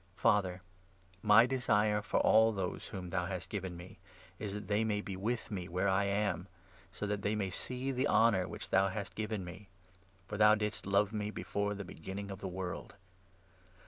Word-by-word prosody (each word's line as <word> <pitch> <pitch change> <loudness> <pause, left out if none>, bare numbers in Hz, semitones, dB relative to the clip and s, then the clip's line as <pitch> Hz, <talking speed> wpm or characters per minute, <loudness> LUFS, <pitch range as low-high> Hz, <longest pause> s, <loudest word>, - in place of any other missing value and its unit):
Father, 100 -4 +2 0.6
my 105 +3 +7
24 - - -3
desire 105 -5 +2
for - - 0
all 110 +1 +6
those 95 -4 -3
whom 90 -4 -6
thou 90 -1 0
hast 95 -2 -5
given 95 -4 -4
me 90 +2 -11 0.4
is 105 -1 -4
that 105 -2 -6
they 105 +2 +2
may 105 -2 0
be 100 -2 -5
with 110 +6 -2
me 90 -4 -3
where 90 +3 0
I 95 +1 +3
am, 100 -3 0 0.4
so 100 +2 -5
that 105 0 -2
theymaysee 110 +6 -2
the 130 +3 +1
honourwhich 105 -8 +2
thou 95 0 +4
hastgiven 100 +1 -4
me; 90 +4 -10 0.6
for 105 - -4
thou 105 0 +7
didst 105 -2 -3
love 100 +1 +2
me 105 -1 -2
before 100 -1 -2
the 100 0 -6
begin 95 +2 -7
ningofthe 100 -1 -5
world. 90 0 -5
100 Hz, 175 wpm, -33 LUFS, 95-105 Hz, 0.6 s, my